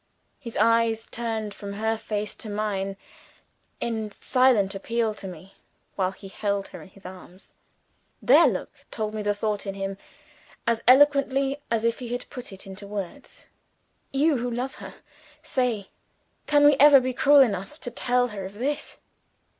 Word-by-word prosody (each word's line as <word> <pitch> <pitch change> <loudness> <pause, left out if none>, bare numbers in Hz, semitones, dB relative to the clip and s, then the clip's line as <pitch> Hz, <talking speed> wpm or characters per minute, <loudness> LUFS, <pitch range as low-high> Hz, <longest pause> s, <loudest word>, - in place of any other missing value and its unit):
His 235 -3 -7
eyes 230 +1 +3
turned 225 -3 -3
from 200 0 -7
her 220 +2 0
face 210 -1 -4
to 220 - -7
mine, 200 -2 -2 0.8
in 220 -2 -2
silent 245 -4 +2
appeal 225 +3 -1
to 200 -2 -8
me 185 +1 -11 0.4
while 185 -2 +1
he 195 +1 -12
held 200 0 -2
her - - -10
in - - -12
his 195 +1 -19
arms. 185 0 -12 0.7
Their - - +6
look - - -2 0.2
told 215 -1 -3
me 215 - -3
the 205 0 0
thought 210 -1 -2
in 195 - -4
him, 195 0 -4 0.7
as 230 -1 +1
eloquently 275 +1 +4
as 230 -1 0
if 230 0 0
he 250 - -6
had 245 +1 -4
put 250 -4 -7
it 195 - -11
into 195 +1 -9
words. 200 -4 -7 0.7
"You, 285 +2 +2
who 245 +1 -2
love 250 +3 -3
her, - - -10 0.5
say 245 -9 -1 0.6
can 290 -1 +5
we 290 - +8
ever 285 0 +8
be 255 0 -2
cruel 285 +3 +6
enough 220 - 0
to 245 - -5
tell 245 +1 +1
her 205 -3 -6
of 190 +1 -7
_this? 280 +7 -3
220 Hz, 165 wpm, -25 LUFS, 200-250 Hz, 0.8 s, we